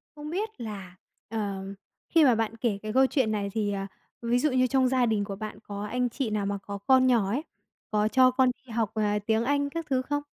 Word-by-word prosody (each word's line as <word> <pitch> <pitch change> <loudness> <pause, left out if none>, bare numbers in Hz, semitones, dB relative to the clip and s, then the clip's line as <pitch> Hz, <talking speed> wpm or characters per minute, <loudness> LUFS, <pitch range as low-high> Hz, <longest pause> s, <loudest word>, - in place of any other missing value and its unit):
Không 300 0 -7
biết 410 +6 -2
là, 200 -5 -7 0.3
ờ, 205 -3 -3 0.5
khi 330 -2 +5
mà 255 -5 +5
bạn 225 0 -1
kể 225 -3 0
cái 215 0 -4
câu 265 +2 +5
chuyện 260 -5 +1
này 205 -2 -1
thì, 210 -2 0
ờ, 195 0 -3 0.3
ví 235 +1 +1
dụ 300 +3 +2
như 255 0 +3
trong 260 0 +3
gia 255 -1 +2
đình 220 -3 +1
của 200 -1 -5
bạn 215 0 -6
có 205 0 -5
anh 245 +3 -1
chị 250 0 -2
nào 210 -1 -1
mà 200 0 -1
có 200 +1 -7
con 260 -1 +6
nhỏ 235 -6 +3
ấy, 260 +9 -1 0.5
có 210 0 +2
cho 255 +3 +5
con 255 0 +3
đi 250 - -12
học, 220 -2 0
à, 210 -1 +1
tiếng 220 +1 +2
Anh 285 +2 +1
các 330 +2 -4
thứ 260 -2 +2
không? 290 +2 -2
230 Hz, 245 wpm, -27 LUFS, 210-260 Hz, 0.5 s, con